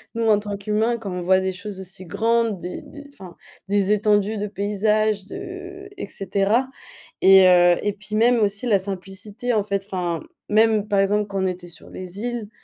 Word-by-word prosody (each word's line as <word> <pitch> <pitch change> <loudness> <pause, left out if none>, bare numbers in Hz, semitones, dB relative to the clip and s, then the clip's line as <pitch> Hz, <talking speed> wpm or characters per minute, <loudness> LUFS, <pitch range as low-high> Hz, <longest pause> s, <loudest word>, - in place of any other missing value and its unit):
Nous 230 - -1
en 210 -2 +5
tant 205 -1 -5
qu'humains, 215 +3 0
quand 205 -4 -6
on 180 - -4
voit 185 +1 +4
des 190 0 -2
choses 195 +1 -8
aussi 185 0 -9
grandes, 230 +2 0
des 180 +1 -6
des 290 -1 -12
enfin 185 -9 -12 0.3
des 200 0 +2
étendues 210 0 +2
de 205 - -2
paysages, 210 +1 0
de 380 - -8
et - - -4
cetera 200 +6 0 0.5
et 190 -1 +8
heu, 175 -1 +6
et 205 - -1
puis 210 +1 -8
même 235 +3 +4
aussi 205 +2 0
la 210 -4 +4
simplicité 195 +5 -5
en 215 -2 +2
fait 200 -1 -2
enfin 175 -4 -2 0.3
même 215 -1 +3
par 200 -2 +1
exemple 205 +2 +2
quand 195 -1 -2
on - - +2
était 180 -1 -5
sur 170 - -13
les 185 +1 -8
îles, 235 -2 -4
205 Hz, 195 wpm, -22 LUFS, 190-220 Hz, 0.5 s, et